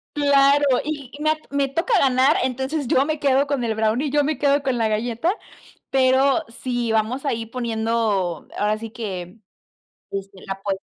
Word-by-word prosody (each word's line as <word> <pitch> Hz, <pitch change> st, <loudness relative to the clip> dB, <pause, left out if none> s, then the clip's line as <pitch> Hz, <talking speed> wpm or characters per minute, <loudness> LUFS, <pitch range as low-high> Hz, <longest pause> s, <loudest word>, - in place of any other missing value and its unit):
¡Claro!, 285 Hz, 0 st, +4 dB, 0.2 s
y 290 Hz, -4 st, -5 dB
me 310 Hz, -, +2 dB
a -, -, +1 dB, 0.2 s
me 280 Hz, -1 st, +1 dB
toca 355 Hz, -, +1 dB
ganar, 270 Hz, +5 st, +4 dB
entonces, 265 Hz, +2 st, -2 dB
yo 265 Hz, +3 st, +3 dB
me 310 Hz, -1 st, -2 dB
quedo 275 Hz, 0 st, +3 dB
con 275 Hz, -3 st, -1 dB
el 225 Hz, -2 st, -1 dB
brownie, 225 Hz, +6 st, 0 dB
yo 290 Hz, +1 st, +2 dB
me 300 Hz, -2 st, -1 dB
quedo 285 Hz, 0 st, +2 dB
con 260 Hz, -3 st, 0 dB
la 225 Hz, -, +2 dB
galleta, 235 Hz, -, -1 dB, 0.6 s
pero, 270 Hz, +4 st, +3 dB
si 240 Hz, -1 st, -3 dB
vamos 225 Hz, +6 st, 0 dB
a 280 Hz, -, 0 dB
ir 225 Hz, -1 st, -5 dB
poniendo 225 Hz, -6 st, -1 dB
ahora 210 Hz, +1 st, +1 dB
sí 225 Hz, 0 st, -7 dB
que, 195 Hz, -4 st, -6 dB, 0.7 s
este, 195 Hz, -1 st, -6 dB
la 195 Hz, -, -3 dB
apues 195 Hz, 0 st, -4 dB
255 Hz, 175 wpm, -22 LUFS, 220-280 Hz, 0.7 s, Claro